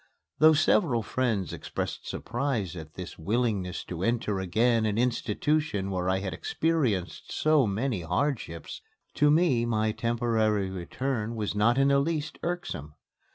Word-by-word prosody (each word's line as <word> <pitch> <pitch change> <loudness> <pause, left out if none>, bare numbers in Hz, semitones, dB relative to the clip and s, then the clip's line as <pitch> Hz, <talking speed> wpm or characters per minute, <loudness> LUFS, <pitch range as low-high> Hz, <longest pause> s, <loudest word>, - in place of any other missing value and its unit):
Though 155 +1 +7
several 150 - +3
friends 110 -6 -1
expressed - - -5
surprise 120 - -2
at 80 -3 -9
this 90 -2 -8
willingness 100 -1 -1
to 85 -1 -6
enter 105 -2 0
again 110 +4 +2
an 105 0 -1
institution 120 -2 0
where 90 -1 -1
I 95 0 +1
had 95 -3 -3
experienced 115 - -1
so 155 -5 +3
many 105 0 -1
hardships, 90 - -2 0.3
to 150 - +3
me 150 -6 +3
my 110 -2 +1
temporary 110 -3 0
return 115 +5 -3
was 105 -2 -2
not 105 +4 +3
in 135 0 +4
the 140 0 +4
least 150 0 -2
irksome. 85 - -4
115 Hz, 140 wpm, -28 LUFS, 95-135 Hz, 0.3 s, Though